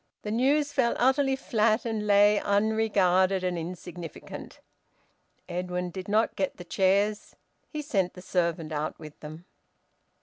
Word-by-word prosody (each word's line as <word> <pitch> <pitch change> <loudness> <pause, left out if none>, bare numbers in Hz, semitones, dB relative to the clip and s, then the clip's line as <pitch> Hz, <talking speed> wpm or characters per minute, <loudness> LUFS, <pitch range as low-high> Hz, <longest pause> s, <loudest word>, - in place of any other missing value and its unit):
The 210 - -4
news 285 +5 +2
fell 250 -4 +2
utterly 265 +2 +3
flat 230 -3 +1
and 220 -2 -2
lay 205 0 +5
unregarded 200 -3 +2
and 180 -1 0
insignificant. 175 -1 -8 0.9
Edwin 180 0 -3
did 185 +1 -7
not 215 +2 +1
get 190 -1 -2
the 175 - -8
chairs. 200 +3 +1 0.3
He 305 -2 -5
sent 190 -10 -1
the 180 - -10
servant 170 -3 -1
out 150 0 -3
with 155 -2 -12
them. 155 +3 -10
195 Hz, 135 wpm, -27 LUFS, 180-220 Hz, 0.9 s, lay